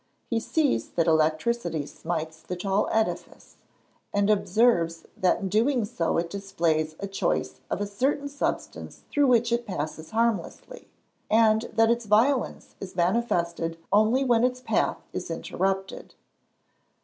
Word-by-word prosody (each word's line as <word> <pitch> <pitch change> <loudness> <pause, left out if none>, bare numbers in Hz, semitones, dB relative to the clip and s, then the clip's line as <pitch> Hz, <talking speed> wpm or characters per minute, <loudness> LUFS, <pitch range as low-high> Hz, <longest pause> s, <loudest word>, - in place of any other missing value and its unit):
He 230 - +2
sees 295 +5 0
that 165 - 0
electricity 160 +1 +1
smites 160 0 -5
the 180 - -5
tall 195 +3 0
edifice, 220 0 -2 0.5
and 205 +1 +2
observes 195 -4 +2
that 185 - +1
in 195 - -2
doing 230 +4 +2
so 200 -7 -1
it 170 0 0
displays 165 -6 -1
a 200 - -3
choice 195 0 -2
of - - -2
a - - 0
certain 270 +8 -1
substance 285 0 -4
through 290 -1 +3
which 240 -2 +3
it 235 0 0
passes 160 -3 -5
harmlessly, 230 - -2 0.4
and 220 +1 +3
that 225 0 +4
its 235 -1 -1
violence 240 +6 +1
is 190 -2 -8
manifested 170 -4 0 0.2
only 220 +6 +4
when 240 -3 +3
its 250 0 +1
path 255 - 0 0.2
is - - -5
interrupted. 195 0 -3
205 Hz, 135 wpm, -26 LUFS, 170-235 Hz, 0.5 s, that